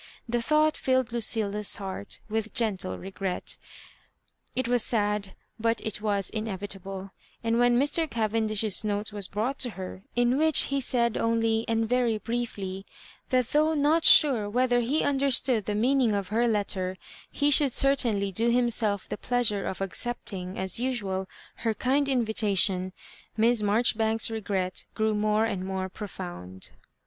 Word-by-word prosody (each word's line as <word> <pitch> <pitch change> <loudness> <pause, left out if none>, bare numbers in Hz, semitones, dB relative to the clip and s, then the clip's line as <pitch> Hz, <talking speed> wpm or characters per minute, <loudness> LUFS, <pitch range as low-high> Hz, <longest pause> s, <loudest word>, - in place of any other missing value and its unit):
The 240 0 0
thought 305 +4 +3
filled 260 -2 0
Lucil 220 -3 +1
la's 210 0 +1
heart 195 0 -5
with 220 -1 -3
gentle 205 -5 0
regret 190 -1 -4 1.0
It 255 -1 -1
was 245 -2 +3
sad, 210 -3 0 0.2
but 230 +1 +1
it 215 -1 -2
was 200 -3 -1
inevitable; 195 -2 -6 0.3
and 230 0 +1
when 245 0 +4
Mr. 295 +3 +1
Cavendish's 220 -2 0
note 210 0 -2
was 200 -2 -2
brought 225 +7 -2
to 250 - +2
her, 185 0 -7
in 245 +2 +2
which 315 -1 +5
he 275 - +1
said 235 -3 0
only, 225 0 +1
and 225 0 0
very 240 -2 +1
briefly, 210 -5 -4 0.5
that 255 -3 +1
though 310 +2 +2
not 305 +3 +3
sure 240 -9 +5
whether 245 +2 +2
ha 270 +7 0
understood 265 -5 +2
the 210 - -2
meaning 245 0 +2
of 200 -2 -3
her 230 +3 +2
letter, 190 -4 -1 0.3
he 290 0 +1
should 285 -1 +4
certainly 230 -8 +2
do 225 +5 +1
himself 235 -4 +1
the - - -5
pleasure 240 -5 0
of 190 - -5
accepting, 195 -2 -2
aa 190 - -2
usual, 205 -7 -2 0.3
her 225 -2 -1
kind 275 +4 +1
invitation. 205 -6 +1 0.5
Miss 230 +1 +3
Marjoribanks's 220 +1 +2
regret 195 -4 -2
grew 220 0 +1
njore 210 +1 +2
and 195 -4 -3
more 190 0 -3
profound. 95 - -8
220 Hz, 150 wpm, -27 LUFS, 200-245 Hz, 1.0 s, which